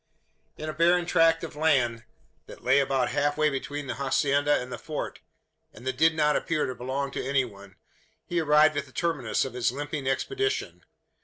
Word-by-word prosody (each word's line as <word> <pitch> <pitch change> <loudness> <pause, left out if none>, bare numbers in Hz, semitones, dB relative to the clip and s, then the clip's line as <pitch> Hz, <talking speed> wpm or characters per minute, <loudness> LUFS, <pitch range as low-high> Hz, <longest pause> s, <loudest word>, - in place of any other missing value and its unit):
In 155 - -6
a 155 - -3
barren 175 +2 +3
tract 165 -1 +3
of 160 - -6
land, 130 -7 +1 0.4
that - - -12
lay 135 +3 +4
about 135 -2 +1
half 145 0 0
way 155 -1 +3
between 145 +2 -4
the - - -5
hacienda 140 +1 +2
and 125 0 -6
the - - -6
Fort - - -5 0.6
and 120 - -13
that 130 -1 -1
did 160 +2 +4
not 150 -1 +2
appear 160 -2 0
to 130 - -3
belong 135 +3 -3
to - - -4
any 135 -1 +1
one 100 -4 -13 0.5
he 175 - -1
arrived 155 0 +4
at - - -2
the - - -17
terminus 155 -11 0
of 130 - -6
his 125 -1 0
limping 145 0 -4
expedition. 400 - -2
145 Hz, 190 wpm, -27 LUFS, 130-155 Hz, 0.6 s, lay